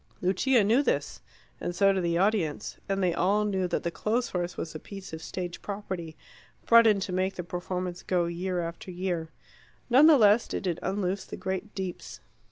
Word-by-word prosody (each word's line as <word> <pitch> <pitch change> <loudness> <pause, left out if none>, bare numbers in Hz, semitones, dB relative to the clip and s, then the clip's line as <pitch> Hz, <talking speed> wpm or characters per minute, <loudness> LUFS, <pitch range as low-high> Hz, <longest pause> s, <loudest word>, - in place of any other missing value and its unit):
Lucia 210 +6 +3
knew 225 +7 +4
this, - - -1 0.4
and 175 - -4
so 195 +1 +4
did 190 - 0
the 170 0 +1
audience; 190 -5 0
and 195 0 0
they 175 -2 +2
all 200 +5 +2
knew 190 -3 0
that 175 - -2
the 170 - -1
clothes 235 +6 -1
horse 175 -1 -3
was 160 - -5
a 155 - -6
piece 195 -1 -10
of 160 - -6
stage 175 0 -5
property, 190 -6 -5 0.5
brought 230 0 +7
in 210 -2 +4
to 190 -1 -4
make 185 +1 0
the 180 - -4
performance 180 +1 -4
go 180 -2 0
year 175 +1 -2
after 170 +2 -6
year. 175 -3 -3 0.6
None 275 +5 +8
the 315 -3 +8
less 215 0 +5
did - - -4
it 175 -3 -1
unloose 190 0 -2
the - - -8
great 190 +2 -4
deeps. 190 -2 -6
185 Hz, 195 wpm, -28 LUFS, 175-205 Hz, 0.6 s, None